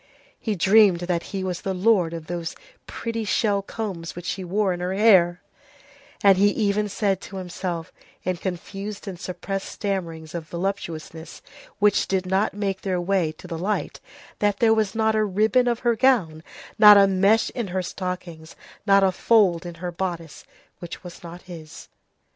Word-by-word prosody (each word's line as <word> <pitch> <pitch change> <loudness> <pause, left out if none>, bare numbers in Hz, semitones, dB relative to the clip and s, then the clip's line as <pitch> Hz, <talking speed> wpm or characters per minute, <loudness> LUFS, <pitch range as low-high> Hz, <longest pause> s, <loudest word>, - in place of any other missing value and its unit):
He 215 -3 -2
dreamed 195 -1 +5
that 175 -1 -1
he 195 -1 -3
was 180 -2 -3
the 190 -1 -3
lord 185 -3 +3
of 165 -2 -7
those 170 -1 -5 0.3
pretty 230 -1 -4
shell 205 -1 +1
combs 195 -5 -6
which 175 0 -8
she 190 - -3
wore 190 +1 0
in 175 - -6
her 180 +1 -2
hair, 185 -5 +4 0.8
and 195 -2 +6
he 200 - +5
even 210 0 0
said 200 -1 0
to 195 - -10
himself, 175 -2 -5 0.3
in 185 -1 -1
confused 195 +4 -6
and 185 -3 -6
suppressed 195 +2 -5
stammerings 170 -6 -4
of 165 -2 -5
voluptuousness 170 -3 -5 0.3
which 205 0 +3
did 190 -1 0
not 190 +2 0
make 195 -2 -2
their 185 -2 -1
way 175 -3 0
to 155 - -15
the 165 -2 -5
light, 205 +4 -2 0.4
that 205 -1 +1
there 225 0 +4
was 215 -2 0
not 220 0 +2
a 215 - +2
ribbon 215 +5 +2
of 240 -1 0
her 235 -2 +2
gown, 215 -12 +2 0.4
not 210 -1 +10
a 200 - +7
mesh 195 +3 +3
in 240 -5 -4
her 185 0 -2
stockings, 175 -3 -6 0.3
not 195 0 +5
a 190 - +4
fold 185 -4 +2
in 170 - -8
her 175 +1 -5
bodice, 170 -3 -5 0.3
which 175 +1 -8
was 175 0 -10
not 175 0 -10
his. 160 -3 -11
190 Hz, 175 wpm, -24 LUFS, 175-205 Hz, 0.8 s, not